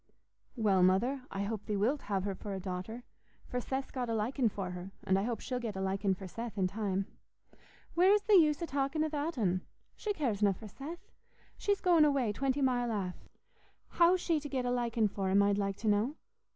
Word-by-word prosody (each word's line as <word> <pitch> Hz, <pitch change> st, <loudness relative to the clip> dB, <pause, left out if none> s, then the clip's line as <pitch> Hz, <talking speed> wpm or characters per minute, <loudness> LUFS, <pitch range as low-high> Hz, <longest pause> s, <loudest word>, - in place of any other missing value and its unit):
"Well, 205 Hz, -6 st, +3 dB
Mother, 230 Hz, +10 st, +3 dB
I 195 Hz, -, -3 dB
hope 210 Hz, 0 st, -4 dB
thee 210 Hz, -, 0 dB
wilt 250 Hz, +9 st, +1 dB
have 195 Hz, -2 st, -1 dB
her 200 Hz, 0 st, -1 dB
for 195 Hz, +1 st, -6 dB
a -, -, -4 dB
daughter; 190 Hz, +6 st, -5 dB, 0.4 s
for 250 Hz, -, -3 dB
Seth's 265 Hz, +2 st, -3 dB
got 250 Hz, -3 st, -3 dB
a 225 Hz, -, 0 dB
liking 235 Hz, +3 st, +1 dB
for 190 Hz, -3 st, -4 dB
her, 180 Hz, +1 st, -6 dB
and 190 Hz, 0 st, +2 dB
I -, -, 0 dB
hope 225 Hz, +1 st, -2 dB
she'll 250 Hz, -2 st, -3 dB
get 225 Hz, -4 st, -4 dB
a -, -, -4 dB
liking 190 Hz, 0 st, 0 dB
for 190 Hz, 0 st, -8 dB
Seth 230 Hz, +3 st, -6 dB
in 190 Hz, -, +2 dB
time." 195 Hz, 0 st, -1 dB, 0.9 s
"Where's 380 Hz, +5 st, +5 dB
th' 435 Hz, -, -1 dB
use 310 Hz, -7 st, +6 dB
o' -, -, +1 dB
talkin' 285 Hz, +1 st, 0 dB
a 315 Hz, -, 0 dB
that'n? 260 Hz, -, 0 dB, 0.3 s
She 425 Hz, -, -3 dB
caresna 210 Hz, -, +1 dB
for 215 Hz, -, -10 dB
Seth. 290 Hz, -, -9 dB, 0.4 s
She's 405 Hz, -1 st, 0 dB
goin' 345 Hz, -4 st, +5 dB
away 275 Hz, -7 st, +2 dB
twenty 275 Hz, +4 st, 0 dB
mile 245 Hz, -2 st, +1 dB
aff. 190 Hz, -4 st, -4 dB, 0.6 s
How's 350 Hz, +2 st, +4 dB
she 330 Hz, -3 st, +1 dB
to 290 Hz, 0 st, -7 dB
get 260 Hz, -3 st, -1 dB
a 245 Hz, -, +1 dB
likin' 235 Hz, -3 st, +1 dB
for 195 Hz, -1 st, -2 dB
him, 200 Hz, +1 st, +5 dB
I'd 200 Hz, 0 st, +2 dB
like 195 Hz, -1 st, -1 dB
to 220 Hz, -, -5 dB
know? 215 Hz, +7 st, +2 dB
225 Hz, 210 wpm, -32 LUFS, 195-275 Hz, 0.9 s, use